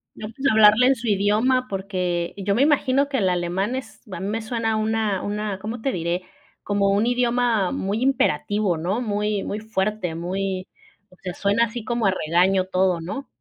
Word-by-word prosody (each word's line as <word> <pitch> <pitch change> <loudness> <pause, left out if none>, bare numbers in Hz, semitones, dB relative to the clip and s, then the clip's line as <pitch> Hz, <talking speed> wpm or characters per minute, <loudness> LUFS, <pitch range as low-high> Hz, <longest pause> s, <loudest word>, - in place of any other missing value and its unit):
No, 210 - -7
pues 265 +5 -2
hablarle 215 +2 +6
en 270 - +4
su 235 -1 -6
idioma 215 +6 +2
porque 185 -4 -2
yo 200 0 0
me 235 - +2
imagino 280 -1 +3
que 275 - -1
el 195 -6 +2
alemán 180 +6 -1
es 260 -3 -7
a 180 - -5
mí 190 - -4
me 220 +2 -2
suena 225 -1 -1
una 215 -2 0
una, 210 -1 -3
¿cómo 220 +4 -6
te 270 - 0
diré? 170 -1 -2 0.4
Como 200 -1 +1
un 205 +3 +2
idioma 245 -4 +1
muy 200 +3 -2
imperativo, 205 - +1
¿no? 185 +9 -1
Muy 210 -2 -1
muy 210 - -4
fuerte, 215 -4 -2
muy 185 +2 -3 0.4
o 185 - -20
sea, 180 -1 -5
suena 205 +5 +2
así 230 0 -6
como 235 0 -1
a 195 - +4 0.2
regaño 185 +3 +3
todo, 185 -2 +1
¿no? 205 +12 -6
210 Hz, 190 wpm, -23 LUFS, 190-230 Hz, 0.4 s, hablarle